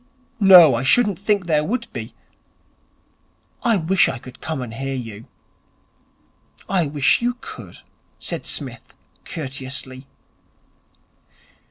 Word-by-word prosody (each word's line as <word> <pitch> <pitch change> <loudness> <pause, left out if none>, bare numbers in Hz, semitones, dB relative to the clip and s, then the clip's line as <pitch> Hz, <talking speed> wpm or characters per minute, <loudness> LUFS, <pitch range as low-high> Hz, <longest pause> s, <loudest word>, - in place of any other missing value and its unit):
'No, 180 -7 +9
I 115 - 0
shouldn't 205 - +3
think 205 -2 0
there 155 -3 +2
would 235 +7 -2
be. - - -7 1.5
I 230 -4 +3
wish 180 +2 +2
I 130 - -4
could 125 +1 -13
come 160 -1 -3
and 115 -2 -8
hear 135 +3 -4
you.' 115 -4 -7 1.4
'I 180 -5 +1
wish 140 - +2
you 245 +1 -1
could,' - - -10 0.4
said - - -5
Psmith - - -4 0.3
courteously. 130 -3 -7
155 Hz, 115 wpm, -21 LUFS, 130-195 Hz, 1.5 s, No